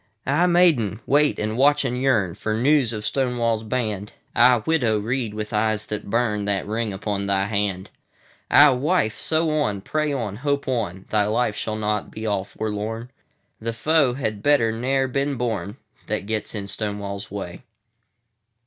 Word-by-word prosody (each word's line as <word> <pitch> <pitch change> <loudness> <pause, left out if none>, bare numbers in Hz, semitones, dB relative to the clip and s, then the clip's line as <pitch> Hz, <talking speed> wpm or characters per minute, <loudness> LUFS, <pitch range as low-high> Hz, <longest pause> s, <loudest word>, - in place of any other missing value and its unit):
Ah, 155 +6 +3
Maiden! 160 - +3
wait 145 +1 +3
and 110 +1 -2
watch 145 +3 +3
and 125 -1 -1
yearnFor 110 -4 0
news 135 -2 +3
of 105 -2 -4
Stonewall's 120 -4 0
band. 110 -3 -3 0.2
Ah, 120 -2 +5
Widow! 125 -10 +2
read, 115 0 -2
with 105 +1 -5
eyes 110 0 +1
that 105 -1 -5
burn, 105 -2 0
That 100 -1 -1
ring 110 +1 -2
upon 100 0 -3
thy 95 -1 +1
hand. 100 -2 -2 0.6
Ah, 145 -1 +7
Wife! 130 -4 +1
sew 160 0 +1
on, 105 -8 -1
pray 155 +7 -1
on, 115 -7 -3
hope 140 +2 -1
on! 100 -8 -2
Thy 105 -1 +3
life 110 0 0
shall 110 0 -3
not 105 -1 -2
be 110 - -7
all 100 -3 0
forlorn. 110 +4 -4 0.5
The 115 +1 -3
foe 145 0 +2
had 110 -6 -3
better 140 -5 +3
ne'er 130 +4 0
been 140 +2 -1
born, 110 -4 -3 0.3
That 105 -2 -2
gets 110 +1 -3
in 100 -2 -3
Stonewall's 100 -1 -4
Way. 95 -3 -6
110 Hz, 160 wpm, -23 LUFS, 105-130 Hz, 0.6 s, Ah